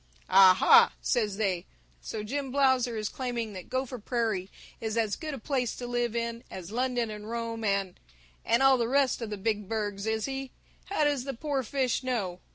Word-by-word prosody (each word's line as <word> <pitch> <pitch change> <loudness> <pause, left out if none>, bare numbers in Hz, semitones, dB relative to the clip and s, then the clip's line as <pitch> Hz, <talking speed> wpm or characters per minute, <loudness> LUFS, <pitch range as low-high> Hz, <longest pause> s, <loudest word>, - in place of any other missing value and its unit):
'Ah 190 -1 +8
ha,' - - +6
says 215 -6 0
they, 190 -5 0 0.4
'so 215 - -5
Jim 270 +4 -3
Blausser 260 -4 +2
is 215 -1 -2
claiming 240 -4 -3
that 185 -2 -9
Gopher 255 -1 -2
Prairie 215 -5 -1 0.3
is 220 0 -3
as 220 -3 +1
good 305 -3 -5
a - - -7
place 255 -1 -1
to 245 - -6
live 240 -1 -1
in 235 0 -2
as 185 0 -8
London 245 -1 0
and 210 0 -8
Rome 230 -1 -4
and 195 -3 -1 0.4
and 235 +3 +2
all 270 -1 +6
the 230 - +1
rest 270 -2 +2
of 230 - -4
the 210 - -4
Big 210 -1 -2
Burgs, 205 -2 -2
is 220 0 0
he? 270 -1 -4 0.4
How 390 -6 0
does 290 -3 +1
the 270 -1 -5
poor 280 +2 -1
fish 260 0 0
know?' 210 -9 -2
230 Hz, 195 wpm, -29 LUFS, 210-260 Hz, 0.4 s, Ah